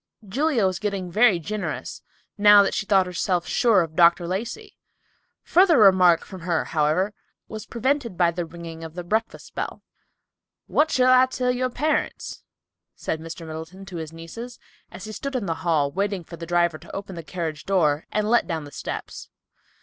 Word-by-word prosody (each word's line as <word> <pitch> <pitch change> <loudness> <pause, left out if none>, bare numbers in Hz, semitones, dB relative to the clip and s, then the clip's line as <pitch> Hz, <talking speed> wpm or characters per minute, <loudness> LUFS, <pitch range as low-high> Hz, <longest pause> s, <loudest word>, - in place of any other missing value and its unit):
Julia 265 +1 +1
was 185 -1 0
getting 195 -4 -3
very 215 0 +5
generous, 200 +6 -5 0.3
now 205 -1 +7
that 195 - -1
she 215 - -2
thought 195 -2 +4
herself 180 0 -1
sure 225 -6 +3
of 160 -1 -8
Dr. 170 0 +4
Lacey. 235 - -5 0.7
Further 355 -2 +4
remark 185 -5 +5
from 190 -3 -10
her, 170 -1 -1
however, 160 +6 +1 0.3
was 215 0 -8
prevented 245 -4 -1
by 170 -1 +3
the 175 +1 -3
ringing 165 0 -9
of 160 0 -9
the 180 - -5
breakfast 220 +6 -3
bell. - - -5 0.8
"What 310 +1 +2
shall 255 -3 +4
I 255 0 +6
tell 250 -1 -1
your 255 +1 -1
parents?" 300 +5 -2 0.5
said 160 - -3
Mr. 165 +1 -8
Middleton 160 +5 -8
to 180 -2 -8
his 160 -1 -6
nieces, 195 +10 -9 0.3
as 185 - -10
he 215 - -7
stood 275 +5 -5
in 240 -5 -1
the 165 - -1
hall, 150 -5 +1
waiting 195 +1 -2
for 170 - -10
the 165 0 -8
driver 170 -2 +1
to - - -11
open 195 -1 -6
the 170 - -6
carriage 160 -2 -5
door 160 -6 +1
and 210 0 0
let 240 +2 +3
down 165 -3 -3
the 145 - -11
steps. - - -7
185 Hz, 180 wpm, -24 LUFS, 170-220 Hz, 0.8 s, now